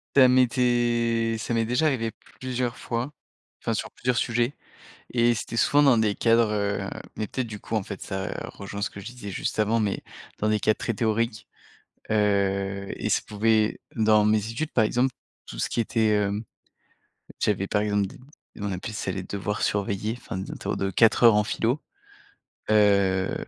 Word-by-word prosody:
Ça 130 -2 +8
m'était 120 -2 +2
ça 115 +1 -2
m'est 115 0 +2
déjà 125 +7 +2
arrivé 115 -6 0 0.3
plusieurs 125 -2 -2
fois, 120 +4 -3 0.5
enfin, - - -1
sur - - -3
plusieurs 125 -1 -1
sujets 120 +2 +1 0.6
et 120 -1 +3
c'était 115 - -5
souvent 145 +5 +4
dans 130 -5 +5
des 105 -2 +2
cadres, 115 -1 +3
heu, 100 -1 -1 0.3
mais 110 - -3
peut-être, 130 +3 -3
du 105 -2 -7
coup, 115 - -4
en 110 - 0
fait, 100 0 -7
ça 95 0 -4
rejoint 100 +1 -7
ce 110 - 0
que - - -10
je 95 - -10
disais 120 -3 -8
juste 100 - -3
avant, 110 +2 +2
mais 105 -3 -1 0.4
dans 110 - +1
des 110 0 +2
cas 110 +1 +3
très 115 +1 -3
théoriques, 110 0 -1 0.6
heu 100 -2 +1
et - - -3
ça - - +3
pouvait 110 +1 +1 0.2
dans 110 -1 +4
mes 105 +1 +4
études, 155 +7 -3
par 110 - +3
exemple, 125 +3 +1 0.3
tout - - -8
ce - - +1
qui 120 - 0
était, 115 -1 +1
hem, 105 +1 0 1.0
j'avais, 100 -2 +1
par 105 +1 +1
exemple, 105 -1 +1
des - - -12 0.4
nous 100 -1 -4
on - - -3
appelait 95 +4 -5
ça 105 -3 -3
les 95 0 -3
devoirs 100 +2 -3
surveillés, 100 +2 -1
enfin, 100 - -7
des 95 - -6
interros - - -3
de 100 0 -1
4 110 +5 +4
heures 115 -2 +8
en 105 - +4
philo, 115 +6 -1 0.9
heu, 100 -3 +3
110 Hz, 185 wpm, -26 LUFS, 100-120 Hz, 1.0 s, Ça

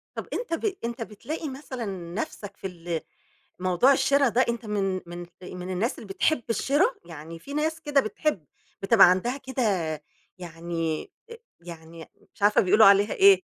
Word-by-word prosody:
طَب - - -5
أنت 470 -9 -2
ب 390 +4 -1
أنت 235 0 -3
بتلاقي 295 +9 -6
مثلًا 265 -3 -6 0.3
نفسك 205 -1 -5
في - - -7
ال 170 -2 -4 0.6
موضوع 185 +8 +4
الشِرا 275 0 +3
ده؟ 245 +3 +3
أنت 235 -1 -3
من 195 -3 -1
من 175 0 -8 0.2
من 180 0 -7
الناس 195 +7 -1
اللي - - -9
بتحب 220 +8 +1
الشرا؟ 275 - +3 0.2
يعني 165 0 -9
في 280 +11 -9
ناس 315 +2 -1
كده 290 -3 +2
بتحب، 215 - -2 0.4
بتبقى 195 -2 +7
عندها 210 +8 0
كده 265 -1 -4 0.8
يعني، 165 -2 -4 0.2
آآ 465 - -9 0.2
يعني 165 -1 -11 0.3
مش - - -19
عارفة 205 +1 +5
بيقولوا 215 +4 +6
عليها 200 +1 +5
إيه. 390 0 +6
210 Hz, 160 wpm, -26 LUFS, 180-270 Hz, 0.8 s, بتبقى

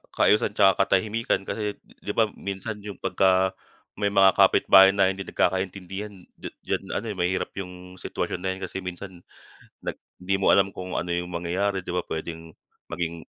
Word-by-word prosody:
kaayusan 105 - +3
tsaka 95 -1 +4
katahimikan, 110 +1 +1
kasi 105 0 -3
di 105 - -8
ba? 110 -3 +2
Minsan 100 +2 -5
yung 100 -2 -8
pagka, 95 0 +2 0.5
may 100 - +1
mga 95 -1 +7
kapitbahay 95 0 +7
na 95 -1 +4
hindi 95 0 -6
nagkakaintindihan, 95 +3 -2 0.2
d - - -7 0.2
diyan - - -3
ano, 110 - -2
eh, 100 - -8
mahirap, 90 +1 -1
yung 90 0 -9
sitwasyon - - -3
na 95 +1 -2
yan 95 - -12
kasi 90 - -5
minsan 90 0 -8 0.6
nag - - -4 0.2
di 95 +1 0
mo 95 - +4
alam 100 0 +4
kung 90 0 -6
ano 90 - -2
yung 90 0 -1
mangyayari, 95 +3 -1
di 90 - -5
ba? 90 - 0
Pwedeng 80 0 -6 0.4
maging 85 -1 -4
95 Hz, 170 wpm, -25 LUFS, 90-100 Hz, 0.6 s, mga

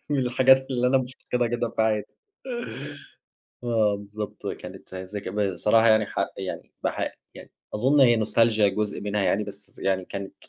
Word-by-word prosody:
من 145 - +2
الحاجات 130 +1 +4
اللي 125 -1 +1
أنا 135 +1 +4
مفتقدها 125 -1 -2
جدًا 120 +1 -1
في - - -15
حياتي. 110 -1 -1 1.5
آه 110 -3 +2
بالضبط، 105 0 -7
كانت 95 -1 -7
زك 95 +2 -6
بصراحة 105 +3 +3
يعني 110 -1 +5
ح - - -11 0.2
يعني - - -6
بح - - -1 0.2
يعني - - -12 0.2
أظن 130 +7 +3
هي 120 -4 +5
Nostalgia 115 0 +3 0.2
جزء 105 -1 -1
منها 105 0 -1
يعني، 100 +2 +1
بس 100 0 -11
يعني 95 -1 0
كانت 100 +1 -6
105 Hz, 155 wpm, -25 LUFS, 100-120 Hz, 1.5 s, يعني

